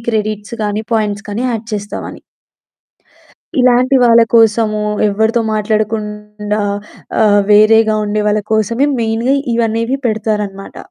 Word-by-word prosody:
Credits 215 -1 -3
కానీ 210 +1 -2
points 205 -2 -1
కానీ 210 +4 -3
add 225 -2 -4
చేస్తామని. 205 0 -6 1.4
ఇలాంటి 250 +1 +3
వాళ్ళ 235 -1 +6
కోసము 220 -1 +3 0.3
ఎవరితో 220 +3 +1
మాట్లాడకుండా 210 -1 -2 0.6
ఆహ్, 205 -2 +4
వేరేగా 215 +1 +5
ఉండే 210 0 -1
వాళ్ళ 210 0 +1
కోసమే 230 +5 +1
మెయిన్‌గా 230 +4 0 0.2
ఇవి 235 0 +1
అనేవి 230 +4 -1
పెడతారన్నమాట. 210 -3 -3
215 Hz, 110 wpm, -14 LUFS, 210-230 Hz, 1.4 s, వాళ్ళ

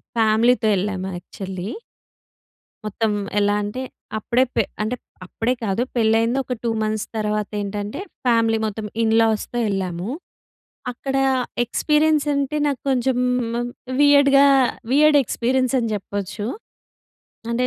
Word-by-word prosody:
ఫ్యామిలీతో 225 +1 +3
ఎళ్ళాము 190 -1 -2
యక్చువల్లి. 190 +1 -7 1.2
మొత్తం 215 +1 -1 0.3
ఎలా 205 0 +2
అంటే 210 +6 -4 0.4
అప్పుడే 240 +4 +2
పె - - +3 0.2
అంటే 220 +4 -1 0.3
అప్పుడే 225 +7 -1
కాదు. 205 +2 0
పెళ్ళైంది 225 +2 +2
ఒక 250 - -3
2 235 - 0
మంత్స్ 215 0 -1
తర్వాతేంటంటే 210 - -3 0.3
ఫ్యామిలీ 230 -2 +3
మొత్తం 215 0 -4 0.2
ఇన్‌‌లాస్‌తో 225 +1 +2
ఎళ్ళాము. 185 0 -3 0.8
అక్కడా 270 +2 -1 0.4
ఎక్స్‌పీరియన్స్ 300 +5 +2
అంటే 280 +2 -1
నాకు 275 -4 -2
కొంచెం 255 -1 +1 0.4
హ్మ్, 240 0 -2 0.3
వియర్డ్‌గా 280 -1 +6 0.5
వియర్డ్ 300 +2 +5
ఎక్స్‌పీరియన్స్ 255 +3 0
అని 230 -2 -2
చెప్పొచ్చు. 205 +1 -5 1.1
అంటే 245 +2 +1
225 Hz, 110 wpm, -22 LUFS, 210-255 Hz, 1.2 s, వియర్డ్‌గా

